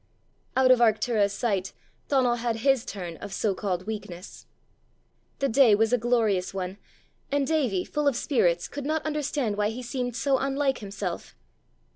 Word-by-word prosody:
Out 260 -1 +5
of 255 - +6
Arctura's 220 -2 +3
sight 200 -3 -1 0.3
Donal 255 -4 +2
had 235 -1 -1
his 270 -3 +3
turn 175 -5 -6
of 205 - -8
so 200 +1 0
called 185 -2 -3
weakness! 205 -4 -7 0.9
The 275 - +1
day 240 -3 +5
was 225 +3 +2
a - - +5
glorious 220 -6 +1
one, 190 +1 -4 0.5
and 285 -1 +1
Davie, 260 - 0
full 295 -1 -1
of 280 - +3
spirits, 180 - +1
could 285 - -6
not 315 0 -1
understand 290 -7 -1
why 210 0 +1
he 245 +3 -6
seemed 245 -1 -3
so 265 +2 +1
unlike 275 0 0
himself. 195 -3 -5
230 Hz, 160 wpm, -26 LUFS, 200-270 Hz, 0.9 s, of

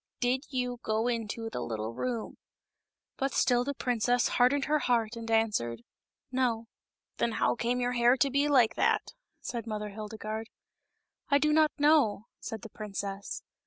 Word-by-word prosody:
Did 255 +3 +1
you 250 -2 -2
go 220 +2 0
into 230 -1 -2
the - - -3
little 110 0 -3
room 240 - -4 0.4
?" - - -60
But 270 0 -1
still 245 0 +3
the 280 +2 -3
princess 245 0 +1
hardened 275 +3 +3
her 305 0 +2
heart 235 -4 +1
and 230 0 -7
answered 205 - +1 0.3
" - - -57
No." 245 -3 0 0.3
" - - -57
Then 235 - +1
how - - +2
came 240 +1 -1
your 245 0 0
hair 240 +1 +4
to 275 +2 +2
be 280 +2 +2
like 255 -6 +4
that - - +1 0.2
?'* - - -57
said 235 -1 -5
Mother 210 -1 -3
Hildegarde. 215 +1 -6 0.4
" - - -49 0.3
I 280 - +5
do 300 +1 +2
not 310 0 +5
know," 290 -9 +3
said 225 -1 -6
the 225 - -8
princess. 200 -1 -5
235 Hz, 180 wpm, -30 LUFS, 220-255 Hz, 0.4 s, I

